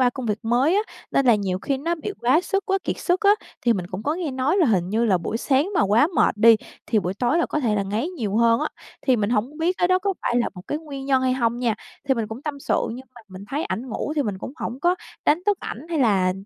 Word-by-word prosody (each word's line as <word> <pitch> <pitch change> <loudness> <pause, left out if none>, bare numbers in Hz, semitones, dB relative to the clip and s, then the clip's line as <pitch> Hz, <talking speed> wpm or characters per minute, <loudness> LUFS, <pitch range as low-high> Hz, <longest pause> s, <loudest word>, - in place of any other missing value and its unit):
qua 250 -1 +4
công 255 0 -6
việc 210 -1 -1
mới 245 +9 +2
á, 415 - +3 0.3
nên 275 - +2
là 235 - +7
nhiều 190 -3 -1
khi 275 +3 -2
nó 335 +5 -1
bị 345 +5 -5
quá 260 +8 +4
sức, 390 +1 -2
quá 390 0 +1
kiệt - - -2
sức 355 0 +1
á. 405 -1 +5 0.3
Thì 240 - +4
mình 185 -5 -3
cũng 185 +4 -6
có 300 +2 0
nghe 340 -5 -3
nói 265 +7 0
là 350 - +4
hình 185 -7 +1
như 225 +2 +1
là 195 -6 +3
buổi 220 - -3
sáng 275 +7 +1
mà - - +3
quá 215 - +4
mệt - - +3
đi 225 +1 +7 0.3
thì 220 - +2
buổi 185 -1 -2
tối 240 - +1
là 340 - +2
có 305 - -2
thể 225 -6 +1
là 200 - +1
ngáy 210 - -2
nhiều 220 - -3
hơn 230 0 +4
á, - - 0 0.4
thì 255 - +4
mình 215 0 0
hổng 245 +7 -1
biết 345 +3 +1
cái 355 - +2
đó 370 0 +4
có 390 0 -1
phải 240 - 0
là 240 - +2
một 180 - -9
cái 295 - -1
nguyên 280 -4 -8
nhân 265 -2 +3
hay 260 -1 +2
hông 240 -2 0
nha. 235 -3 +1 0.3
Thì 265 - +4
mình 230 -2 -2
cũng 225 +4 -7
tâm 290 -2 -5
sự, - - 0
nhưng 260 +2 -10
mà 240 - -13
mình 190 +1 -10
thấy 290 +4 -2
ảnh 250 +4 -4
ngủ 285 +5 -3
thì 290 - +3
mình 205 -6 -3
cũng 255 - -7
hổng 255 +4 -5
có 350 +2 +3 0.3
đánh 320 +4 +3
thức 410 -2 +3
ảnh 270 +8 -7
hay 330 -2 -1
là, 195 -8 +3
255 Hz, 295 wpm, -23 LUFS, 220-305 Hz, 0.4 s, là